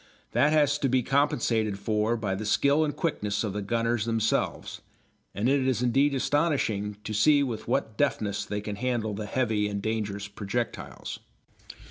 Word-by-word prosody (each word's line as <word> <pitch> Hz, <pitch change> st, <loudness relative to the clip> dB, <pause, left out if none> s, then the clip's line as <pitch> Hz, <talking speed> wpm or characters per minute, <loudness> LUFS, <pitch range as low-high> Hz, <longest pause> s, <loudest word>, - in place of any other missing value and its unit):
That 140 Hz, +6 st, +3 dB
has 145 Hz, -1 st, +3 dB
to 135 Hz, -, +1 dB
be 130 Hz, 0 st, +2 dB
compensated 120 Hz, -7 st, +1 dB
for 110 Hz, +3 st, 0 dB
by 105 Hz, -4 st, -2 dB
the 95 Hz, +3 st, -3 dB
skill 140 Hz, +8 st, +3 dB
and 145 Hz, -2 st, -2 dB
quickness 105 Hz, -10 st, -1 dB
of 105 Hz, -3 st, -2 dB
the 105 Hz, -, -3 dB
gunners 115 Hz, +1 st, 0 dB
themselves, 115 Hz, -1 st, -1 dB, 0.5 s
and 105 Hz, +5 st, 0 dB
it 135 Hz, 0 st, +2 dB
is 125 Hz, -2 st, +1 dB
indeed 135 Hz, +3 st, +3 dB
astonishing 130 Hz, -9 st, 0 dB
to 110 Hz, -, -4 dB
see 145 Hz, +7 st, +4 dB
with 115 Hz, -5 st, -4 dB
what 110 Hz, -2 st, -1 dB
deftness 105 Hz, -1 st, 0 dB
they 105 Hz, 0 st, -4 dB
can 105 Hz, -1 st, -5 dB
handle 120 Hz, -3 st, -1 dB
the 105 Hz, +1 st, -5 dB
heavy 110 Hz, -4 st, 0 dB
and 100 Hz, -1 st, -3 dB
dangerous 105 Hz, -2 st, -3 dB
projectiles. 105 Hz, +3 st, -4 dB
115 Hz, 165 wpm, -27 LUFS, 105-135 Hz, 0.5 s, see